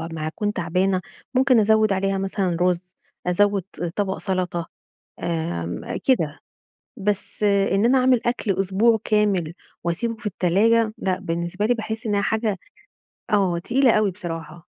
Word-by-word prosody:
ه 165 - -5
ما 155 -1 -4
أكون 205 +6 -2
تعبانة، 185 +2 0 0.3
ممكن 260 -2 +4
أزوّد 215 -1 +4
عليها 195 0 0
مثلًا 190 -2 -1
رز، 180 +1 0 0.3
أزوّد 200 +1 +2 0.3
طبق 195 -2 -1
سلطة، 180 -3 -2 0.6
آمم، 160 - -3
كده، 165 - +2 0.6
بس 205 0 -2
إن 200 +1 +3
أنا 260 +2 +5
أعمل 255 -2 +4
أكْل 220 -5 0
أسبوع 210 +4 +3
كامل 200 -7 +1 0.3
واسيبه 230 +7 -1
في 220 +1 -16
التلاجة 215 +5 +2
لأ، 185 -3 -1
بالنسبة 170 +2 -2
لي 245 - +3
باحس 220 0 -5
إنها 205 -2 +1
حاجة 215 -1 0 0.7
آه 190 -5 +2
تقيلة 245 +6 +3
أوي 215 -2 +3
بصراحة. 165 -2 -7
195 Hz, 140 wpm, -23 LUFS, 175-220 Hz, 0.7 s, أنا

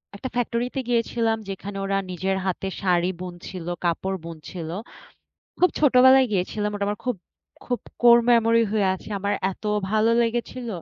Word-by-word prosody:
১ - - -10
টা - - -1
ফ্যাক্টরিতে 245 +2 -1
গিয়েছিলাম 230 -1 +1
যেখানে 195 +1 -6
ওরা 195 0 0
নিজের 190 +2 -1
হাতে 190 +1 -2
শাড়ি 180 -2 +2
বুনছিল, 180 -1 -7 0.2
কাপড় 190 +3 -1
বুনছিল। 165 0 -7 0.9
খুব 360 - +4
ছোটবেলায় 260 -2 +6
গিয়েছিলাম, 205 +2 -1
ওটা 205 0 -1
আমার 205 0 -2
খুব, 250 -3 -1 0.5
খুব 245 -1 -2 0.2
কোর 235 0 +8
মেমোরি 230 -1 +4
হয়ে 210 -3 +2
আছে। 190 - -11
আমার 200 +1 -1 0.2
এত 190 - -18 0.3
ভালো 215 +1 +3
লেগেছিল। 240 +1 -3
210 Hz, 150 wpm, -24 LUFS, 190-240 Hz, 0.9 s, কোর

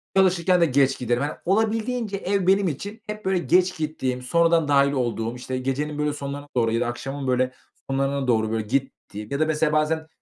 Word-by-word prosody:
çalışırken 180 -1 +3
de - - +6
geç 135 -2 +2
giderim. 120 +2 0
Hani, 150 - -2
olabildiğince 220 +2 0
ev 195 -1 -1
benim 195 0 +4
için 205 - -5
hep 210 -1 -6
böyle 190 -1 +2
geç 180 +1 +2
gittiğim, 130 -5 -2
sonradan 165 +3 +2
dâhil 140 -1 +4
olduğum, 120 -3 -2
işte, 130 +1 -5
gecenin 145 +3 -2
böyle 150 0 0
sonlarına 145 0 -6
doğru 115 -2 +2
ya 115 - 0
da - - 0
akşamın 135 +3 -5
böyle 130 0 +1 0.4
sonlarına 135 0 0
doğru 110 -2 +2
böyle 110 -1 -1
gittiğim 125 -5 -3
ya 140 - -1
da 155 - +3
mesela, 155 -1 +1
bazen 160 +1 +1
145 Hz, 195 wpm, -24 LUFS, 130-180 Hz, 0.4 s, de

